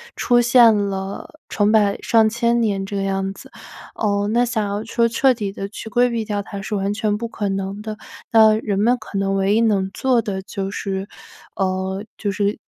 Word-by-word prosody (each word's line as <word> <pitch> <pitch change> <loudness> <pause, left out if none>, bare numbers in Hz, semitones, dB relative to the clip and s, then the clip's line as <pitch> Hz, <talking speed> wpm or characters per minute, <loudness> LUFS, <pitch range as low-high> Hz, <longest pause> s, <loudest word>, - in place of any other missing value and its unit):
出 240 0 +3
现 235 -2 +6
了 195 -1 -3 0.2
成 205 0 +1
百 205 -2 +3
上 225 -2 +4
千 235 +1 +1
年 200 -3 0
这 200 +1 -6
个 195 - -1
样 195 0 -1
子。 - - -14 0.4
呃， 205 -1 0
那 240 +1 +3
想 220 -3 -1
要 205 +2 -3
说 230 0 +1
彻 260 +4 +3
底 205 -4 -3
地 195 0 -6
去 220 - -9
规 245 +3 +3
避 230 -2 -2
掉 205 -1 -2
它 200 0 -8
是 210 - -5
完 195 0 0
全 210 -1 0
不 230 +2 -4
可 210 -3 -4
能 195 +2 -4
的。 215 -1 -5 0.4
那 220 -1 +6
人 200 -2 -1
们 240 +4 +3
可 200 -2 -5
能 195 0 0
唯 195 +1 +2
一 225 - +3
能 195 -4 +1
做 250 -4 +1
的 190 -2 -3
就 195 0 -5
是 195 -1 -4 0.5
呃， 190 0 -2
就 205 -2 -2
是 200 +1 -1
205 Hz, 220 characters per minute, -20 LUFS, 195-225 Hz, 0.5 s, 现